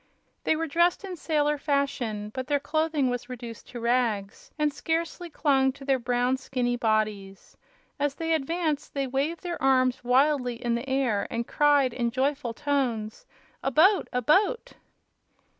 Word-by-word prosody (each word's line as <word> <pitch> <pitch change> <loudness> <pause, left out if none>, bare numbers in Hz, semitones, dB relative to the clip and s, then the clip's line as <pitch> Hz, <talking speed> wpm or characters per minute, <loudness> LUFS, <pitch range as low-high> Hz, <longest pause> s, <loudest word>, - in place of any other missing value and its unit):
They - - +3
were 325 +1 -1
dressed 340 +5 +2
in 380 -2 -5
sailor 295 -2 0
fashion, 250 -8 -1
but 260 -1 -4
their 285 0 +1
clothing 310 -3 0
was 245 0 -4
reduced 235 -2 -8
to 245 - -7
rags 230 -4 -1
and 300 -1 +1
scarcely 335 +3 -2
clung 270 -4 +2
to 275 0 -12
their 270 -1 +2
brown, 245 +1 +1
skinny 250 -2 -1
bodies. 215 -4 -2 0.4
As 285 -1 0
they 325 +1 -1
advanced 315 0 -1
they 275 -1 0
waved 275 +7 -2
their 345 -1 -4
arms 255 -1 +2
wildly 255 0 +2
in 235 0 -2
the 235 +3 -3
air 260 -6 +1
and 235 0 -2
cried 290 -4 +3
in 235 -1 0
joyful 265 +1 -1
tones: 250 -7 -2 0.3
"A - - 0
boat! 370 - +4
a 250 -1 -1
boat!" 405 - +2
270 Hz, 160 wpm, -27 LUFS, 245-300 Hz, 0.4 s, boat